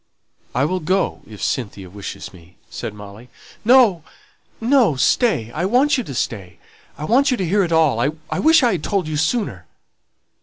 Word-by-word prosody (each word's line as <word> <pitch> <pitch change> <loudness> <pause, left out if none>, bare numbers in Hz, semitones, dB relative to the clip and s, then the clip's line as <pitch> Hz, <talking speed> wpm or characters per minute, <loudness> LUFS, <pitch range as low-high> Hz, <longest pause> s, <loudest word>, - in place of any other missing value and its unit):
"I 130 +3 +2
will 185 +4 -1
go 185 +4 -1
if 105 -2 -10
Cynthia 100 -6 -3
wishes 100 +1 -8
me," 90 0 -18
said - - -6
Molly. 105 +4 -12 0.3
"No, 225 -8 +5 0.6
no; 235 - +3
stay 130 - +1
I 170 +8 -2
want 260 +8 +3
you 250 - -1
to 135 - -7
stay 100 -7 -4 0.4
I 150 - -5
want 265 - +3
you 250 - +1
to 190 - -2
hear 200 +5 +2
it 170 - -3
all 160 -7 +3
I 150 +5 -3
wish 320 -1 +5
I 240 - +4
had 175 -6 -3
told 190 -1 -1
you 155 - -3
sooner." 155 - -1
160 Hz, 180 wpm, -20 LUFS, -, 0.6 s, No